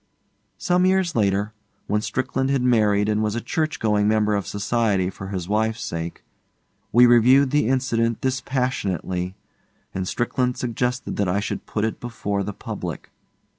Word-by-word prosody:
Some 180 +1 +2
years 185 -3 +2
later, 105 0 +1 0.3
when 105 0 0
Strickland 130 +3 -1
had 135 -2 +1
married 105 -4 +3
and 105 0 +1
was 105 0 -1
a - - 0
church 155 +6 -2
going 105 -2 +2
member 105 0 +2
of 100 -2 -1
society 100 -3 0
for 95 - -8
his 95 -3 -4
wife's 110 +2 0
sake, 85 0 -5 0.7
we 120 +2 +7
reviewed 125 +3 +5
the 150 -6 +2
incident 120 -3 +1
dispassionately, 125 - -2 0.6
and 95 -1 -3
Strickland 125 +3 -1
suggested 125 +1 -2
that 100 -3 +1
I 95 +3 +1
should 105 - -4
put 105 0 -1
it 110 - -3
before 105 -4 -3
the 100 +1 -3
public. - - -6
110 Hz, 155 wpm, -23 LUFS, 100-125 Hz, 0.7 s, we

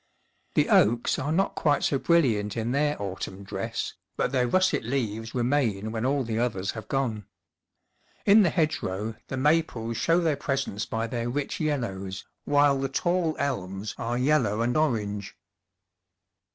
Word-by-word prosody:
The - - +3
oaks 115 +3 +3
are 145 +3 -2
not 190 +5 +1
quite 145 -3 +1
so 135 - +1
brilliant 120 -12 +2
in 115 +1 -1
their 145 +2 +1
autumn 95 0 -5
dress, 95 - -4 0.2
but - - 0
their 125 -2 +2
russet 185 +4 +2
leaves 115 -2 -3
remain 120 -5 0
when 115 +2 -1
all 140 0 +1
the 115 -1 -2
others 100 -6 -1
have 110 - -8
gone. 115 -7 -2 1.0
In 210 +2 +7
the 185 - +4
hedgerow 115 - -1
the 135 - -4
maples 130 -6 +1
show 165 +1 +3
their 160 -4 +1
presence 135 -7 -2
by 110 0 -2
their 120 0 -3
rich 145 +9 -3
yellows, 100 - -2 0.2
while 145 -1 +4
the 135 0 -1
tall 175 +3 0
elms 100 -7 -3
are 120 +1 -1
yellow 125 -6 +2
and 120 +1 0
orange. 105 -9 -1
125 Hz, 150 wpm, -27 LUFS, 110-145 Hz, 1.0 s, In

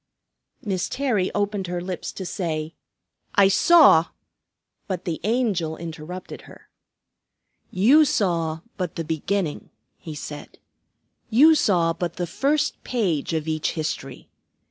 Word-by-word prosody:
Miss 190 -4 -2
Terry 245 -9 0
opened 205 -2 -1
her 175 0 -3
lips 180 0 -5
to 190 - -6
say, 160 -4 -3 0.6
"I 195 -1 +6
saw 275 - +6 0.4
" - - -53
but 185 -3 -4
the 165 -3 -3
Angel 205 -8 0
interrupted 170 +2 -8
her. - - -16 1.0
"You 255 +12 +5
saw 165 - 0 0.2
but 180 -4 -3
the 165 - -3
beginning," 160 +2 -2 0.3
he 160 -2 -8
said. 150 0 -8 0.7
"You 285 +8 +6
saw 175 - +2
but 170 0 -4
the 175 - -2
first 280 - -1
page 180 - -1
of 160 -1 -2
each 155 -1 -1
history. 155 -2 -5
180 Hz, 125 wpm, -23 LUFS, 160-205 Hz, 1.0 s, I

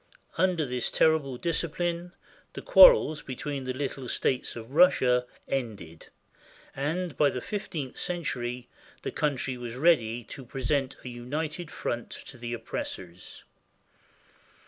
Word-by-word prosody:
Under 180 -4 +2
this 125 -2 -1
terrible 150 -5 +2
discipline 170 +2 -2 0.4
the - - -6
quar - - +11
rels 155 - -2
between 135 +1 -5
the 130 - -2
little 135 -1 -4
states 130 - -1
of 115 +1 -9
Russia 130 -7 +4 0.2
ended, 105 -11 -4 0.7
and 160 +4 -2
by 145 - +4
the 125 - -3
fif 205 - -5
teenth 140 -6 -5
century 125 -8 -3 0.4
the - - -3
country 135 -3 -1
was 120 -1 -6
ready 125 -6 +3
to 135 - -9
present 135 +2 -1
a - - -4
united 150 +7 -4
front 120 -5 -4
to 130 - -10
the 120 0 -5
oppressors. 95 -6 -6
135 Hz, 130 wpm, -28 LUFS, 120-160 Hz, 0.7 s, quar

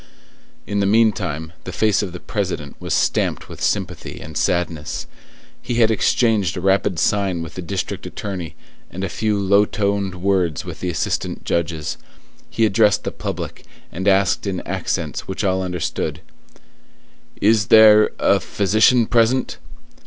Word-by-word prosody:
In 100 - -2
the 100 - +2
meantime, 85 -8 +1
the - - -6
face 110 -3 +2
of 100 -4 -4
the 90 - -8
President 90 -10 -4
was - - -6
stamped - - 0
with - - -11
sympathy - - -2
and 80 -1 -10
sadness; 85 -3 -1 0.6
he 120 0 -3
had 115 -1 +4
exchanged 110 -3 +1
a - - -1
rapid 95 0 +1
sign 95 -1 0
with 80 - -9
the 90 - -6
district 95 +1 -4
attorney 90 -6 -6 0.3
and 95 +2 -6
a 95 - -2
few 105 +1 -1
low 100 +1 +4
toned 100 -2 -1
words 90 -5 0
with - - -7
the 90 - -2
assistant 85 - -2
judges; 80 -2 -2 0.5
he 115 - +1
addressed 105 0 +3
the - - -3
public, - - -6 0.3
and 95 +4 -4
asked 95 0 +2
in 95 -3 -2
accents - - -3
which 95 +3 -4
all 95 -1 +1
understood:— 90 -3 -3 1.2
"Is 105 0 +3
there 110 -1 +7
a 100 - +3
physician 110 +5 +3
present?" 120 +3 +1
100 Hz, 150 wpm, -20 LUFS, 90-105 Hz, 1.2 s, there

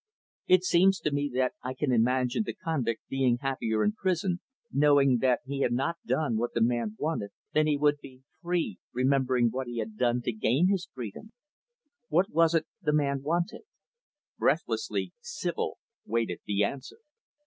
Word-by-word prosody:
It 185 -1 +5
seems 185 +2 +4
to 150 - 0
me 145 0 0
that 130 0 +1
I 130 +1 -4
can 135 0 0
imagine 125 - +2
the - - -5
convict 135 -9 -2
being 130 -3 +2
happier 120 -5 -1
in 210 - +3
prison, 185 -3 -1 0.3
knowing 140 -3 +4
that 125 -1 +2
he 140 +1 -4
had 120 - +2
not 135 +7 0
done 140 -8 +1
what 120 +2 -2
the 115 - +1
man 115 -2 0
wanted, 150 -10 -2 0.2
than 155 0 +3
he 150 -1 +2
would 145 0 +3
he, 130 -1 -13 0.2
free, 175 -1 -1
remembering 130 -2 +2
what 130 +1 -3
he 120 -1 -5
had 110 -1 -4
done 120 -1 +1
to - - 0
gain 125 +11 +2
his 190 -2 -1
freedom. 130 - -8 0.7
What 185 +4 +2
was 165 0 +4
it 160 -1 +2 0.2
the 150 -5 +1
man 140 -2 +1
wanted?" 170 +5 -1 0.8
Breathlessly, 445 - 0
Sibyl 480 0 -3 0.3
waited 115 -5 -1
the 105 0 +1
answer. 130 - -4
135 Hz, 170 wpm, -28 LUFS, 120-165 Hz, 0.8 s, It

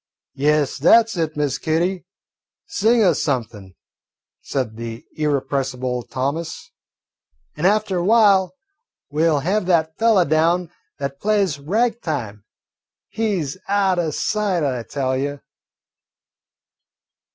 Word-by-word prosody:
"Yes, 145 0 +1
that 225 +10 +6
's 225 - -6
it, 160 -2 -2
Miss 145 -2 -1
Kitty, 175 +3 -1 0.6
sing 230 -6 +2
us 175 -7 +3
something," 110 - -3 0.7
said 125 -5 -3
the 115 0 -7
irrepressible 135 -4 -1
Thomas, 140 +7 -4 0.8
"an' 180 - +1
after 200 -3 +1
while 200 0 +4 0.6
we 160 +3 +2
'll 150 -3 +1
have 190 +4 0
that 160 -3 +2
fellah 220 -6 +4
down 165 +3 +1 0.3
that 140 0 -5
plays 200 -8 +1
'Rag 225 +10 0
time.' 110 - -4 0.7
He 210 -6 -1
's 140 +4 -6
out 195 -2 +2
o' 165 -2 0
sight, 195 +2 -1
I 130 -4 -1
tell 130 +3 -2
you." 140 +2 -3
160 Hz, 120 wpm, -21 LUFS, 140-195 Hz, 0.8 s, that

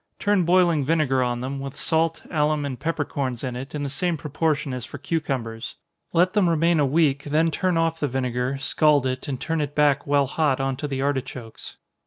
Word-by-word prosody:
Turn 205 -4 +2
boiling 175 -4 +4
vinegar 140 -3 +2
on 120 -1 -1
them, 135 +2 -4
with 135 0 -7
salt, 165 0 0
alum, 150 -2 +1
and 130 -3 -5
peppercorns 145 -6 -2
in 125 -2 -3
it, 135 +4 -7
in 145 - -3
the - - -1
same 175 +4 -1
proportion 150 -1 -1
as 125 -2 -4
for - - -8
cucumbers. 130 -7 -3 0.4
Let 180 +2 +3
them 200 -5 +3
remain 165 0 +3
a 145 - +3
week, 140 -1 +2
then 155 +3 +2
turn 180 +1 0
off 165 0 +1
the 145 - 0
vinegar, 125 0 -1
scald 145 0 +3
it, 130 0 -3
and 135 -3 -3
turn 165 -1 -1
it 145 0 -4
back 145 -1 +3
while 140 -1 +3
hot 145 -1 0
on 135 0 -1
to 150 - -3
the 135 -1 -2
artichokes. 130 -4 -4
145 Hz, 205 wpm, -24 LUFS, 130-165 Hz, 0.4 s, boiling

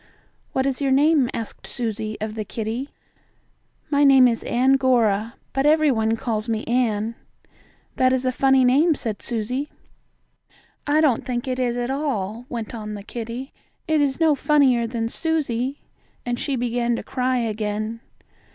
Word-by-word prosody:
"What 265 - 0
is 275 0 -1
your 275 - +1
name?" 285 -1 +4
asked 225 -2 -6
Susie 220 -3 -4
of 215 0 -4
the 215 -1 -4
kittie. 225 +6 -4 1.0
"My 285 0 +3
name 270 -2 +7
is 230 -2 -1
Ann 255 +3 +3
Gora, 235 -4 +2 0.2
but 270 +2 +1
every 310 -1 +4
one 220 -2 +1
calls 220 -1 -3
me 220 -1 -1
Ann." 230 -2 0 0.8
"That 255 0 +4
is 260 0 0
a 255 - +2
funny 265 0 +3
name," 295 +6 +4
said 220 -6 -4
Susie. 250 +5 -2 1.2
"I 300 +2 +3
don't 275 -7 +2
think 245 0 -3
it 255 0 -2
is 245 -1 0
at 245 +1 -2
all," 245 -5 -3
went 230 -2 -5
on 215 -2 -6
the 200 - -8
kitten. 235 +4 -6 0.4
"It 315 -2 +2
is 275 0 0
no 320 -2 +4
funnier 270 -5 +3
than 225 -1 -2
Susie," 275 -3 -2 0.4
and 240 0 -2
she 280 - -2
began 240 -1 0
to - - -5
cry 255 0 -1
again. 215 -1 -2
245 Hz, 160 wpm, -23 LUFS, 225-270 Hz, 1.2 s, name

